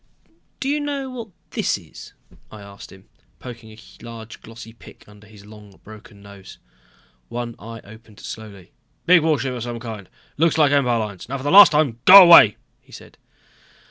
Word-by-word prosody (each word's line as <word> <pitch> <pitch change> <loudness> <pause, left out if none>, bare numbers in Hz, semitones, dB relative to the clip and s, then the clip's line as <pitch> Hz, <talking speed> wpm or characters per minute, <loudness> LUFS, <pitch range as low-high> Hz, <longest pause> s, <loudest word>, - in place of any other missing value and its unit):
"Do 270 - -5
you 290 +2 -2
know 280 -2 -6
what 235 -3 -9 0.2
this - - -3
is?" - - -16 0.4
I 105 -1 -13
asked 100 0 -14
him, 95 0 -19 0.3
poking 120 -3 -13
a 110 - -17 0.2
large 115 -1 -12
glossy 115 0 -14
pic 115 - -19
under 105 +1 -19
his 105 -1 -18
long 105 -2 -17
broken 105 -1 -16
nose. 100 -1 -15 0.7
One 120 -1 -7
eye 115 +1 -12
opened 110 0 -18
slowly. 100 -4 -12 0.3
"Big 180 -1 +4
warship 150 -4 -2
of 125 - -8
some 120 0 -7
kind, 110 -5 -10 0.3
looks 165 +2 0
like 150 -3 +2
Empire 125 -4 0
lines. 105 0 -7
Now 140 - -5
for 130 - -11
the 145 - -3
last 200 -1 +8
time 145 -6 -1
go 195 +1 +10
away!" 170 - +6 0.2
he - - -26
said. - - -16
115 Hz, 175 wpm, -19 LUFS, 105-145 Hz, 0.7 s, go